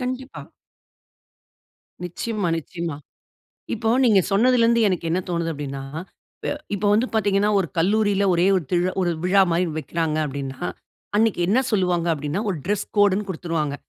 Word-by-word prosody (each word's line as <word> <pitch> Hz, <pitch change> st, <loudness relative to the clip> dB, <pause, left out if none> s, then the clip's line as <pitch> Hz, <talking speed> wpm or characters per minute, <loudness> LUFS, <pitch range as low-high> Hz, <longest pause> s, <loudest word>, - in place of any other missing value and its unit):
கண்டிப்பா. 255 Hz, +1 st, -5 dB, 1.6 s
நிச்சயமா, 200 Hz, +2 st, -3 dB
நிச்சயமா. 165 Hz, -1 st, -5 dB, 0.8 s
இப்போ, 225 Hz, 0 st, -2 dB, 0.2 s
நீங்க 215 Hz, -5 st, +5 dB
சொன்னதிலருந்து 235 Hz, +2 st, +4 dB
எனக்கு 175 Hz, -3 st, -1 dB
என்ன 180 Hz, -, +1 dB
தோணுது 170 Hz, -1 st, -1 dB
அப்டின்னா, 140 Hz, -2 st, -5 dB, 0.6 s
ப -, -, -4 dB, 0.3 s
இப்போ, 205 Hz, +1 st, -1 dB
வந்து 225 Hz, +4 st, +2 dB
பார்த்தீங்கன்னா, 205 Hz, -1 st, +2 dB
ஒரு 190 Hz, -, 0 dB
கல்லூரில 200 Hz, +2 st, +2 dB
ஒரே 175 Hz, +2 st, +3 dB
ஒரு 180 Hz, -, -1 dB
திரு 180 Hz, +1 st, +2 dB
ஒரு 175 Hz, -, +1 dB
விழா 195 Hz, +2 st, +5 dB
மாரி 170 Hz, +2 st, +2 dB
வைக்கிறாங்க, 160 Hz, 0 st, -2 dB
அப்டின்னா. 135 Hz, -2 st, -6 dB, 0.6 s
அன்னைக்கு 220 Hz, -3 st, +2 dB
என்ன 220 Hz, -, +3 dB
சொல்வாங்க? 180 Hz, -5 st, +1 dB
அப்டின்னா. 150 Hz, +4 st, -2 dB
ஒரு 185 Hz, -, -2 dB
டிரெஸ் 205 Hz, +1 st, -1 dB
கோடுன்னு 205 Hz, 0 st, +3 dB
குடுத்துருவாங்க. 165 Hz, -5 st, -2 dB
185 Hz, 140 wpm, -23 LUFS, 165-210 Hz, 1.6 s, நீங்க